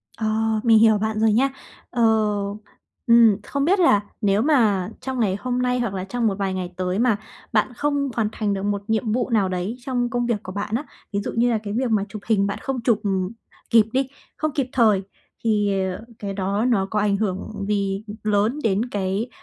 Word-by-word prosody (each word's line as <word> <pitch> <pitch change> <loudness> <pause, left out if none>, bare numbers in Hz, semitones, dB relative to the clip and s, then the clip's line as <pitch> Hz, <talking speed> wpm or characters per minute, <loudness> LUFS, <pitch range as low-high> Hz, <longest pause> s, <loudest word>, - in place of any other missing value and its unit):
Ờ. 225 - -3 0.4
Mình 225 -2 +6
hiểu 220 -1 +5
bạn 215 +1 -1
rồi 220 0 +4
nha. 265 +5 +3 0.4
Ờ, 245 - -2 1.1
ừm, 230 -3 +6
không 280 0 -1
biết 385 +4 +3
là 210 - +5 0.2
nếu 200 0 +2
mà 220 -10 +3
trong 265 -1 -4
ngày 200 -5 +2
hôm 250 +1 -1
nay 250 0 +1
hoặc 235 -5 -1
là 185 -1 -3
trong 230 +3 -1
một 195 - 0
vài 195 -1 -1
ngày 180 -1 -4
tới 185 +2 -1
mà 235 -4 +3 0.4
bạn 220 +3 +2
không 285 +1 0
hoàn 220 -3 +1
thành 210 -2 -1
được 195 - -3
một 205 0 -1
nhiệm 220 0 0
vụ 245 +3 0
nào 210 -5 +2
đấy 185 +5 -2
trong 245 -2 -1
công 240 +1 -1
việc 225 -3 -1
của 185 - -7
bạn 205 +3 -3
á, 280 +6 -2 0.3
ví 200 - +1
dụ - - -4
như 240 +1 +3
là 230 - +2
cái 205 -1 -4
việc 250 +2 0
mà 210 -3 +2
chụp 210 0 -7
hình 200 -3 +2
bạn 200 - -3
không 265 -3 -3
chụp, 230 -3 +2
ừm, 190 -2 0 0.4
kịp 225 -2 +6
đi, 265 0 +1 0.3
không 310 0 -1
kịp 270 -3 0
thời 215 -6 +4 0.4
thì, 205 -3 +1
ờ, 185 - -7 0.2
cái 200 -1 -4
đó 200 +3 -1
nó 215 -6 +2
có 210 - +1
ảnh 200 -1 +2
hưởng 200 0 -3
gì 200 -1 -1 0.2
lớn 215 +6 +1
đến 220 +3 +1
cái, 200 +3 -2
215 Hz, 220 wpm, -23 LUFS, 200-245 Hz, 1.1 s, Mình